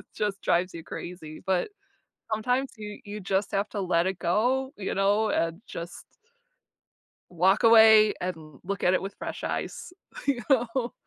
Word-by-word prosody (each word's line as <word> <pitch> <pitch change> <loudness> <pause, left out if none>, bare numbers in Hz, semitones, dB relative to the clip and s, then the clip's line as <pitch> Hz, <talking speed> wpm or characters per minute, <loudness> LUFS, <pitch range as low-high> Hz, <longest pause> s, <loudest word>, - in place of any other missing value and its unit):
just 205 -2 -2
drives 180 +2 +1
you 165 -1 -8
crazy, 165 -4 -8
but 190 - 0 0.6
sometimes 250 +5 0
you 210 -1 -8
you 205 +1 -6
just 195 +1 -1
have 200 +1 -1
to 205 - -4
let 175 -1 +1
it 190 -1 -3
go, 255 +9 +1
you 195 - -3
know, 205 +3 +2
and 165 +4 -1
just 170 +1 -8 1.2
walk 185 +5 +2
away 220 -2 +7
and 160 -5 -6
look 200 +2 -4
at 180 - +4
it - - +2
with 195 +1 -6
fresh - - -6
eyes, 360 - -4 0.3
you 265 -4 +1
know. 245 -1 +1
200 Hz, 155 wpm, -27 LUFS, 180-220 Hz, 1.2 s, away